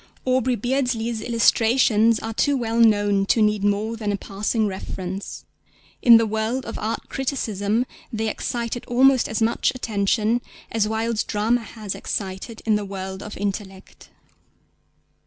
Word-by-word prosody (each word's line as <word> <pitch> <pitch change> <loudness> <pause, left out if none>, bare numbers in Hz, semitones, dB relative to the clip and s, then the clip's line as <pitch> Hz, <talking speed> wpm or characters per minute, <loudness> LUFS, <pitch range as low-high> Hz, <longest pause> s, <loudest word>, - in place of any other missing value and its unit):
Aubrey 255 -1 +2
Beardsley's 240 -2 -1
illustrations 230 -1 +3
are 225 +1 -5
too 285 +5 +2
well 230 -2 -1
known 205 -3 +4
to 230 - +3
need 210 -1 +2
more 205 +2 0
than 215 -2 -2
a 200 - -1
passing 210 +3 -1
reference. 190 -1 -5 0.6
In 235 -2 +9
the 225 - +2
world 220 +4 -2
of - - -6
art 220 +2 -3
criticism 230 -4 -1 0.3
they 220 -1 -2
excited 235 +2 -3
almost 260 +1 +4
as 220 0 0
much 230 +1 +1
attention 220 0 0 0.3
as 220 -2 +1
Wilde's 220 0 -1
drama 225 +3 0
has 215 -2 -6
excited 195 +3 -5
in 220 - +3
the 210 - -4
world 190 0 -6
of 210 - -8
intellect. 195 -1 -6
220 Hz, 140 wpm, -23 LUFS, 205-235 Hz, 0.6 s, In